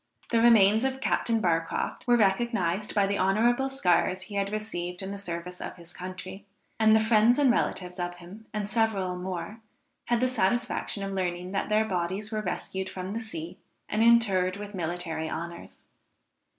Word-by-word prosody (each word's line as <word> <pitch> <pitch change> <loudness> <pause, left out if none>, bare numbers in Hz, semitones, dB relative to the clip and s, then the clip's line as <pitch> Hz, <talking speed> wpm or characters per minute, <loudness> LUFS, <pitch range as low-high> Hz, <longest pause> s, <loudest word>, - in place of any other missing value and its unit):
The 230 -2 +3
remains 220 -1 +6
of 265 0 -1
Captain 230 -3 +1
Barcroft 165 +3 -1
were 240 0 +5
recognised 200 -2 +1
by 200 -2 +4
the 200 0 -1
honorable 235 +8 +2
scars 185 -6 +1
he 205 - -11
had 200 0 0
received 185 -4 -4
in 190 - -5
the 200 - -5
service 180 -1 -6
of - - -6
his 170 -1 -12
country; 185 +1 -8 0.4
and 220 0 +6
the - - +6
friends 220 +2 +4
and 280 -4 +5
relatives 180 -5 -1
of 175 0 -3
him, 180 +6 -13
and 210 -2 -3
several 205 -5 0
more, 185 +4 -5 0.4
had 240 -1 +1
the 255 - +2
satisfaction 235 -3 0
of 195 - -3
learning 180 -1 -2
that 195 +1 -2
their 215 +1 +3
bodies 190 +2 -2
were 215 -1 -1
rescued 190 0 -4
from 185 +1 -5
the 225 - -2
sea, 175 -7 -7 0.3
and 215 - 0
interred 200 -5 +4
with 205 0 -8
military 165 -3 -3
honors. 170 +2 -7
195 Hz, 175 wpm, -28 LUFS, 180-220 Hz, 0.4 s, remains